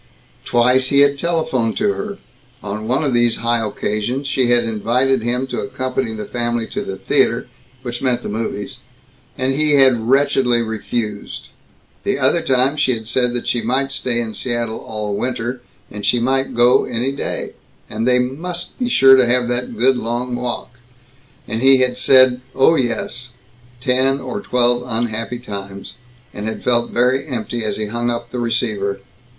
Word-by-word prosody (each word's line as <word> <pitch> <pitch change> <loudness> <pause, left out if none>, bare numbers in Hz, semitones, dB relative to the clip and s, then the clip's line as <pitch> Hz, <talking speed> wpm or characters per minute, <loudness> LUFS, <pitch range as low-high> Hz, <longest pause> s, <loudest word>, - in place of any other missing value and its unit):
Twice 125 +2 +3
he 140 +1 +4
had 140 0 +3
telephoned 155 -9 0
to 205 -1 +2
her. 205 -1 -5 0.5
On 105 +1 -5
one 130 +6 +1
of 140 -4 0
these 120 -1 +3
high 115 0 0
occasions 105 +5 -2
she 130 -2 +1
had 120 0 +4
invited 120 +4 +1
him 125 +3 -1
to 130 - -4
accompany 130 -2 -2
the 105 -1 -5
family 120 0 -2
to - - -3
the 95 - -5
theater - - +1 0.4
which 120 -1 -5
meant 125 -2 0
to - - -4
the - - -4
movies 105 -3 -4 0.6
and 130 +1 0
he 150 +1 +1
had 125 -4 +4
wretchedly 135 -3 +3
refused; 110 -1 -4 0.5
the - - 0
other 140 +5 +2
time 135 -1 +2
she 130 -4 +2
had 110 -1 -8
said 125 0 +1
that 120 - -3
she 120 - 0
might 130 +4 0
stay 125 -3 -1
in 115 -2 -3
Seattle 120 -2 -2
all 105 -2 -4
winter, 120 +2 -3 0.3
and 105 0 -7
she 120 - +2
might 135 +3 0
go 120 +1 +4
any 120 +4 -1
day, 140 - -4 0.4
and 110 +3 -3
they 125 0 +4
"must 165 - -4
be 245 -1 0
sure 135 - +7
to 130 -2 +4
have 125 0 +2
that 120 -2 -3
good 130 +3 +3
long 120 +1 -3
walk"; 120 0 -5 0.7
and 110 +1 -3
he 135 0 +6
had 130 -1 +1
said 130 0 +5
"oh 135 +5 +5
yes," 120 -2 -2 0.5
ten 130 +2 +2
or 130 -2 -5
twelve 120 0 +2
unhappy 115 0 -2
times, 100 -4 -7 0.4
and 105 +1 -5
had 110 - -5
felt 120 -1 +2
very 125 +4 +1
empty 120 -3 -3
as 105 -2 -2
he 110 - -2
hung 120 +3 -2
up 120 0 -4
the 125 - -3
receiver. 110 -5 -1
120 Hz, 175 wpm, -19 LUFS, 115-130 Hz, 0.7 s, sure